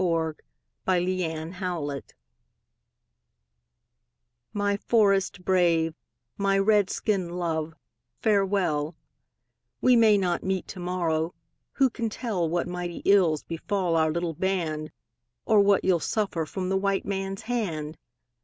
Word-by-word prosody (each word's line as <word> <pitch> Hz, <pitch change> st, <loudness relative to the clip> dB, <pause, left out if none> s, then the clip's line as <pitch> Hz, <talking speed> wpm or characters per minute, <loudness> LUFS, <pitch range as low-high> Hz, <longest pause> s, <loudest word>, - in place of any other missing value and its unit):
A -, -, +2 dB
CRY 165 Hz, -2 st, +1 dB, 0.5 s
FROM 185 Hz, -, +3 dB
AN 175 Hz, -, +2 dB
INDIAN 175 Hz, -1 st, -3 dB, 0.2 s
WIFE 140 Hz, -1 st, -5 dB, 2.5 s
My 205 Hz, -1 st, 0 dB
forest 195 Hz, -4 st, +2 dB
brave, 170 Hz, -3 st, +3 dB, 0.5 s
my 195 Hz, 0 st, +2 dB
Red 200 Hz, -1 st, +3 dB
skin 195 Hz, -5 st, -1 dB
love, 160 Hz, -2 st, -2 dB, 0.4 s
farewell; 190 Hz, -7 st, +1 dB, 0.8 s
We 255 Hz, -1 st, +5 dB
may 220 Hz, -3 st, +6 dB
not 180 Hz, -3 st, 0 dB
meet 190 Hz, -1 st, -1 dB
to 185 Hz, -, -7 dB
morrow; 170 Hz, -2 st, -1 dB, 0.4 s
who 270 Hz, -3 st, +3 dB
can 230 Hz, -1 st, -2 dB
tell 205 Hz, -8 st, -2 dB
What 175 Hz, +1 st, -1 dB
mighty 175 Hz, -1 st, -5 dB
ills 180 Hz, -7 st, +4 dB
befall 175 Hz, +1 st, -1 dB
our 160 Hz, -1 st, +3 dB
little 170 Hz, 0 st, -2 dB
band, 160 Hz, -3 st, -2 dB, 0.5 s
Or 215 Hz, -2 st, +5 dB
what 200 Hz, -1 st, +4 dB
you'll 185 Hz, -2 st, +3 dB
suffer 175 Hz, -5 st, -1 dB
from 185 Hz, +1 st, -3 dB
the 190 Hz, -, +2 dB
white 195 Hz, 0 st, 0 dB
man's 195 Hz, -1 st, -3 dB
hand? 170 Hz, -11 st, -3 dB
185 Hz, 125 wpm, -26 LUFS, 165-200 Hz, 2.5 s, may